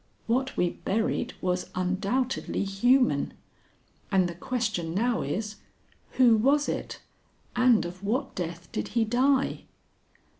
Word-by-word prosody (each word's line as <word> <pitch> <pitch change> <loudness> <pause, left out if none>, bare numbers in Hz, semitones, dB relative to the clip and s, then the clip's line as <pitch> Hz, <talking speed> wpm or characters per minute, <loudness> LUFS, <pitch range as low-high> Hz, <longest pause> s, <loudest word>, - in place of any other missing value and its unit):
What 260 +3 0
we 175 -1 +2
buried 220 +4 -1
was 180 0 -1
undoubtedly 200 +10 -1
human, 245 +7 +2 0.8
and 190 -2 +3
the 175 - -5
question 180 -4 -2
now 235 +3 +1
is, 210 +9 -3 0.6
Who 240 -3 +5
was 280 +6 +3
it, - - -4 0.5
and 245 -2 +4
of 180 +2 -8
what 225 +7 -1
death 175 -1 -5
did 105 - -3
he 225 - +4
die?" 265 +4 +1
215 Hz, 120 wpm, -27 LUFS, 185-250 Hz, 0.8 s, Who